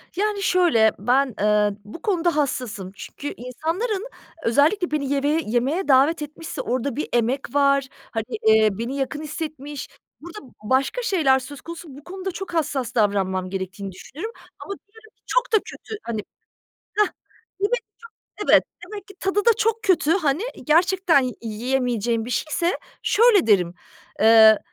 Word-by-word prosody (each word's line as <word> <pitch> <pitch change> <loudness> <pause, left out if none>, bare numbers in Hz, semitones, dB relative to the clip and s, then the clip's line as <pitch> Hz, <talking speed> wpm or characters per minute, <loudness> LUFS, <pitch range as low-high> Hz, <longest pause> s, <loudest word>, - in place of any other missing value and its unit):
Yani 410 +1 0
şöyle, 330 - +4
ben, 260 -1 +2
ııı, 210 -1 +3
bu 210 +11 -11
konuda 350 -5 +1
hassasım. 235 -9 -2
Çünkü 285 +10 -7
insanların 350 - -3 0.4
özellikle 300 - +3
beni 285 -2 0
yemeve 290 +3 +1
yemeğe 260 - 0
davet 285 +4 +4
etmişse 300 0 -6
orada 255 +1 -2
bir 300 - -3
emek 245 +4 0
var, 275 -1 +3 0.2
hani, 225 -2 -2 0.2
eee, 220 0 +6
beni 235 +4 -3
yakın 280 +2 -3
hissetmiş, 295 -2 -6 0.3
burada 345 +6 -9 0.2
başka 265 - +1
şeyler 315 - +3
söz 270 +2 -10
konusu, 335 0 -9
bu 285 - -13
konuda 380 +2 -5
çok 385 0 -7
hassas 275 -7 -1
davranmam 190 -4 +1
gerektiğini 190 +1 -5
düşünürüm 310 - -8 0.3
ama 400 - -6
diyelim 435 +1 -18
ki - - -45
çok - - +1
da - - +8
kötü, 445 - -8
hani 225 -2 -3 0.8
Hah, 420 -1 +5 0.5
bir - - 0
de - - 0
çok 435 -3 -7 0.6
Evet, - - +7 0.2
demek 415 -2 -8
ki 395 - -14
tadı 390 +2 0
da 470 - +7
çok 450 0 0
kötü, 370 -7 +2
hani, 315 -2 +1 0.2
gerçekten 350 0 +4
yi 255 -1 -3
yiyemeyeceğim 235 0 -1
bir 245 - -7
şeyse, 335 +6 0 0.2
şöyle 445 -4 +4
derim, 180 -5 +3 0.5
ııı, 220 0 +8
285 Hz, 155 wpm, -23 LUFS, 235-360 Hz, 0.8 s, da